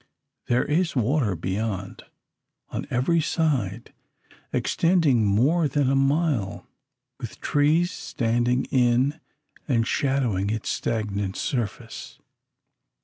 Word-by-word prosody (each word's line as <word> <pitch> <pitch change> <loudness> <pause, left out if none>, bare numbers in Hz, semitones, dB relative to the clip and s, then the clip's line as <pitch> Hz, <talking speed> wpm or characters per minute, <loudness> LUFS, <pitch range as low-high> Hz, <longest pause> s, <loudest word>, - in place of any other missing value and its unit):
There 120 +1 +2
is 170 +3 0
water 125 -4 +1
beyond, 95 +3 -4 0.6
on - - -5
every 160 +7 +2
side, 130 - -1 0.6
extending 160 - +2
more 140 +11 +3
than 140 -1 +1
a - - +2
mile, 135 - 0 0.5
with - - -8
trees 155 +5 +2
standing 120 +1 0
in 130 +3 +2 0.5
and 115 -5 +2
shadowing 130 -11 0
its 110 +1 -2
stagnant 100 -4 -2
surface. 120 -9 -4
125 Hz, 95 wpm, -25 LUFS, 110-150 Hz, 0.6 s, more